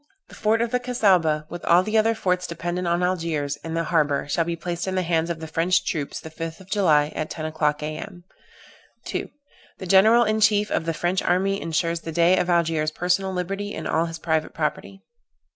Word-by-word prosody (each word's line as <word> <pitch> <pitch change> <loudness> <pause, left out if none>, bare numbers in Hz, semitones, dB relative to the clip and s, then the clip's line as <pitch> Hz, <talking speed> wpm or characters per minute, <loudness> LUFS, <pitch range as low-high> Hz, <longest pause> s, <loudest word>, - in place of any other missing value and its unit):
The - - -15
fort 225 +2 +1
of 235 - -3
the 250 - +1
Cassaubah, 185 -11 +2
with 175 +1 -8
all 175 +2 +5
the 215 +3 -3
other 225 +1 +3
forts 180 -4 -1
dependent 175 +1 -3
on 170 +1 +1
Algiers, 165 -6 -1
and 165 0 -4
the 165 - +1
harbor, 150 -4 +1
shall 165 +3 0
be 170 0 -2
placed 175 +2 -4
in 190 - -2
the 185 - +1
hands 165 -1 0
of 170 -2 -3
the 160 - -6
French 170 +3 +1
troops 150 -4 -3
the 160 - -10
5th 165 0 -6
of 190 0 -16
July, 155 -7 +3
at 155 - -3
10 155 - -5
o'clock, 150 -1 -1
A.M. 175 +4 -6 0.8
"2. - - -4 0.5
The 190 - -7
general 215 +6 +6
in 215 -1 0
chief 210 -1 +3
of 160 - 0
the 165 -1 -2
French 175 +3 0
army 195 +2 +1
ensures 165 +1 -1
the 165 - -7
Dey 170 +3 +4
of 180 - -1
Algiers 165 -3 +1
personal 180 +4 0
liberty, 195 +3 -3
and - - -5
all 165 +1 +1
his 165 0 -6
private 160 -1 -1
property. 165 +5 -3
170 Hz, 210 wpm, -24 LUFS, 160-190 Hz, 0.8 s, general